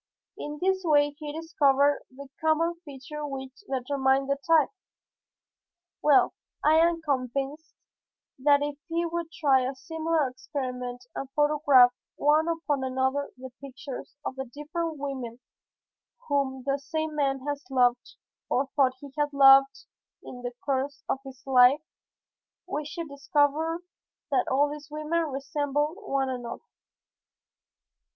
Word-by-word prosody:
In 295 0 -6
this 380 +1 +1
way 290 -3 +4
he 300 -1 -5
discovered 290 -3 +2
the 275 +2 -11 0.2
common 320 +2 +2
features 295 0 -8
which 265 -2 -6 0.2
determined 270 +1 +1
the 280 - +1
type. 325 -3 +5 1.3
Well, 290 -3 +5 0.3
I 310 +1 +5
am 335 0 +2
convinced 275 +2 -2 0.6
that 285 +1 +4
if 290 0 -4
we 335 +1 0
could 340 -1 -3
try 275 -6 +3
a 260 +2 -2
similar 320 +1 -1
experiment 250 -2 -5
and 270 - -5
photograph 290 -4 +5 0.2
one 305 +2 +3
upon 320 -5 -1
another 265 +2 0
the 260 0 -9
pictures 270 0 -8
of 260 - -4
the 265 - -3
different 305 +5 -4
women 260 -4 -5 0.9
whom 270 -3 0
the 275 0 0
same 315 +2 -3
man 275 -2 0
has 290 0 -3
loved 245 -2 +1 0.3
or 270 +2 +1
thought 260 -3 +3
he 280 -2 -11
had 295 0 +1
loved 275 +7 +6 0.4
in 245 - -9
the 245 0 -5
course 280 +1 -1
of 270 - 0
his 265 -2 -12
life 265 +2 +5 0.8
we 295 +1 -3
should 330 +2 -5
discover 295 +4 0 0.5
that 260 -3 +2
all 285 +2 +3
these 295 0 -8
women 305 +2 -1
resembled 290 +3 -2
one 275 -9 -1
another. 245 - -6
285 Hz, 130 wpm, -27 LUFS, 265-305 Hz, 1.3 s, loved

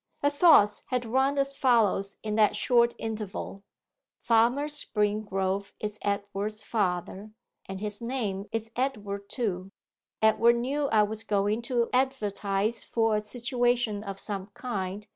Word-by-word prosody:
Her 285 - +4
thoughts 285 - +5
had 250 -2 -1
run 265 +4 +1
as 275 0 0
follows 215 -7 +2
in 215 -1 -2
that 210 -1 +3
short 235 +1 +3
interval: 215 -3 -5 0.6
'Farmer 240 +5 +2
Springrove 205 -7 -1
is 210 0 -4
Edward's 205 +1 -3
father, 200 0 -2 0.3
and 190 0 -6
his 210 +1 -4
name 215 -5 -3
is 225 0 -3
Edward 205 -6 -3
too. 195 -6 -2 0.5
'Edward 230 +2 +4
knew 275 +5 -1
I 215 -4 +4
was 220 +1 -4
going 205 +1 0
to 240 -2 +2
advertise 215 -4 0
for 225 -2 +1
a - - +2
situation 240 -1 0
of 195 -2 -6
some 195 -2 -5
kind. 205 -4 -4
215 Hz, 135 wpm, -28 LUFS, 200-240 Hz, 0.6 s, thoughts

